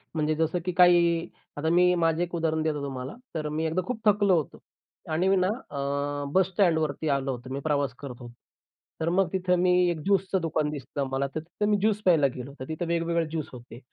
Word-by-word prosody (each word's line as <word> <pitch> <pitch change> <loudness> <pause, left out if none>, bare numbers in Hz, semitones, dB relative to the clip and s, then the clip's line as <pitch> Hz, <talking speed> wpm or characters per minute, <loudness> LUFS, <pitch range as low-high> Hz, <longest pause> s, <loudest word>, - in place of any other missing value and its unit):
म्हणजे 155 0 +1
जसं 160 +2 0
की 180 - 0
काही 170 -1 +5 0.3
आता 160 +2 0
मी 180 +1 +4
माझं 165 -1 +1
एक 175 0 -6
उदाहरण 160 -1 0
देतो 155 -2 -1
तुम्हाला. 130 0 -5 0.2
तर 155 -1 -2
मी 155 +2 -2
एकदा 160 +3 0
खूप 250 -3 -3
थकलो 205 -2 +4
होतो 155 - -4 0.5
आणि 175 +4 +1
ना, 185 -1 +2 0.2
अ, 140 0 -2
बस 190 -1 +4
स्टँडवरती 160 -5 +1
आलो 140 -1 0
होतो, 120 +1 -11
मी 140 - -3
प्रवास 145 -3 0
करत 135 -3 -7
होतो. 120 -1 -10 0.7
तर 160 - +1
मग 185 +2 +2
तिथं 180 -1 +1
मी 180 0 +3 0.2
एक 170 -2 -2
ज्यूसचं 195 -1 +1
दुकान 155 -2 0
दिसलं 140 -1 -4
मला. 135 +1 0
तर - - 0
तिथं 175 +6 -3
मी 205 - +4
ज्यूस 210 +1 +1
प्यायला 160 -6 +5
गेलो. 130 +2 -7
तर 130 - -5
तिथं 160 +2 -3
वेगवेगळे 170 0 0
ज्यूस 155 -1 -4
होते. 120 -1 -11
160 Hz, 205 wpm, -27 LUFS, 145-180 Hz, 0.7 s, काही